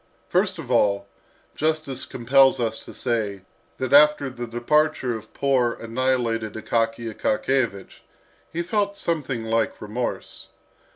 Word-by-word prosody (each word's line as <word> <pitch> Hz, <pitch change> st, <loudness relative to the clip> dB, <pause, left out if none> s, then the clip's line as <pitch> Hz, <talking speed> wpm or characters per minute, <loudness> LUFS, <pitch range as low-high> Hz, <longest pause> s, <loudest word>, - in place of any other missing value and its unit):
First 185 Hz, +1 st, +1 dB
of 140 Hz, -6 st, -7 dB
all, 100 Hz, -4 st, +3 dB, 0.5 s
justice 155 Hz, -3 st, -1 dB
compels 135 Hz, +2 st, +4 dB
us 110 Hz, -2 st, -1 dB
to -, -, -10 dB
say, 110 Hz, -5 st, -2 dB, 0.4 s
that 130 Hz, 0 st, -2 dB
after 145 Hz, -2 st, +6 dB
the 120 Hz, -1 st, -6 dB
departure 125 Hz, +2 st, +1 dB
of 110 Hz, 0 st, -10 dB
poor, 130 Hz, -4 st, +2 dB
annihilated 115 Hz, -2 st, -1 dB
Akaky 115 Hz, 0 st, -1 dB
Akakiyevich, 110 Hz, -3 st, -1 dB, 0.5 s
he 170 Hz, +1 st, -2 dB
felt 200 Hz, +2 st, -1 dB
something 135 Hz, -8 st, -2 dB
like 115 Hz, 0 st, 0 dB
remorse. 110 Hz, +4 st, -5 dB
125 Hz, 120 wpm, -24 LUFS, 115-145 Hz, 0.5 s, after